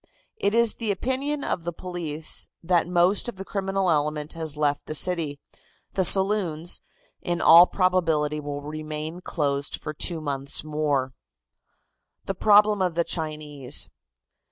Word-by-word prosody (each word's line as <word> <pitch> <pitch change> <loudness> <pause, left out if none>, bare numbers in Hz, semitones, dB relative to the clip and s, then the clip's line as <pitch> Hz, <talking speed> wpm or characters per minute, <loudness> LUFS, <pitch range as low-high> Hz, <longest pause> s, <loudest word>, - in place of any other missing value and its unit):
It 205 - 0
is 235 -1 +3
the 225 -2 -3
opinion 265 +8 -1
of 170 - -2
the 175 - -3
police 165 -3 -5 0.2
that 170 -1 +2
most 180 +6 +2
of 240 - -8
the 195 0 -8
criminal 195 -2 -1
element 150 0 -1
has 160 -3 -2
left 145 -1 0
the 155 - -4
city. 160 -4 +2 0.5
The 190 - +1
saloons, 185 -4 +2 0.4
in 175 0 -2
all 170 +2 +8
probability 165 -5 +1
will 145 -1 -5
remain 155 +2 -6
closed 140 -4 -2
for 150 - -6
two 165 +2 0
more - - -10
months. 140 -1 -2 1.6
THE 195 - -2
PROBLEM 210 +1 +4
OF 180 -3 0
THE 170 - +2
CHINESE. 150 -5 -2
170 Hz, 140 wpm, -25 LUFS, 150-190 Hz, 1.6 s, all